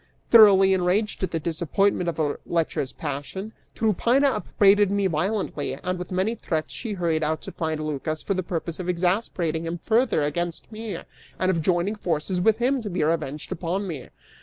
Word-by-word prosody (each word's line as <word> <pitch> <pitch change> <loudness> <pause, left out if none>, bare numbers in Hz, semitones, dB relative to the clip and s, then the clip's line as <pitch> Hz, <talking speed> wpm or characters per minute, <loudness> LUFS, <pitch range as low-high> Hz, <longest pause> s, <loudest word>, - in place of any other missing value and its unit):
Thoroughly 195 -4 +8
enraged 190 +4 0
at 190 - 0
the 165 - -2
disappointment 170 +3 0
of 170 - -5
her 150 -3 -1
lecherous 160 -5 -1
passion, 165 +10 -5 0.2
Tryphaena 235 +6 +3
upbraided 205 -5 +3
me 200 0 +1
violently, 175 -4 -1
and 180 +5 -3
with 180 - -6
many 190 +4 0
threats 160 -8 -3
she 225 -4 -4
hurried 170 -4 0
out 155 +1 -1
to - - -7
find 160 -2 -2
Lycas 155 +1 -3
for 200 - 0
the 185 - -1
purpose 170 -2 -4
of 180 -1 -3
exasperating 175 -3 0
him 170 +1 -3
further 220 - +2
against 170 +6 -3
me 215 -4 -5 0.4
and 185 0 +2
of 165 -3 0
joining 175 +4 +1
forces 180 -2 -2
with 220 +3 +4
him 255 +2 +1
to 215 - -5
be 175 -3 -1
revenged 150 -2 -2
upon 180 +4 -2
me. 155 -7 -6
180 Hz, 180 wpm, -25 LUFS, 160-205 Hz, 0.4 s, Thoroughly